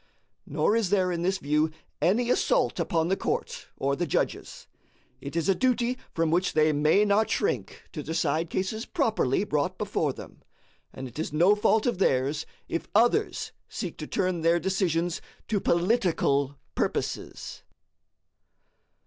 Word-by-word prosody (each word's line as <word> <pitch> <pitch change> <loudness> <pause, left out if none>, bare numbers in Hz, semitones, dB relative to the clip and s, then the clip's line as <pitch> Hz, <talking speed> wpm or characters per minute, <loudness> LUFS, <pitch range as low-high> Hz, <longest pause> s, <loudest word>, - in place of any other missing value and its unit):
Nor 210 - +1
is 225 -5 +1
there 185 -2 +2
in 170 -1 -2
this 190 +2 +1
view 150 -1 +1 0.3
any 235 +7 +2
assault - - +2
upon 165 -1 +1
the 190 - +3
court - - -3
or 140 +1 0
the 175 +3 -2
judges. - - -2 0.5
It 140 +3 -7
is 165 +1 0
a 195 - +5
duty 250 +2 +1 0.2
from 165 -1 +1
which 180 +3 +1
they 155 0 +3
may 155 +8 +4
not 210 +2 +2
shrink - - -1
to 155 - -5
decide 160 +1 -1
cases 220 +4 -2
properly 220 - +1
brought 180 0 -1
before 200 -8 -1
them, - - -11 0.5
and 130 - -7
it 125 - -10
is 160 - -2
no 175 +7 +5
fault 215 +1 +2
of 240 -7 0
theirs 140 -3 +1 0.2
if 165 - -3
others 240 - +2 0.2
seek - - -5
to - - -5
turn 185 -4 -1
their 165 +1 +3
decisions 175 -2 0 0.3
to 210 -2 +1
political 170 - +1 0.2
purposes. - - -3
175 Hz, 150 wpm, -27 LUFS, 155-210 Hz, 0.5 s, a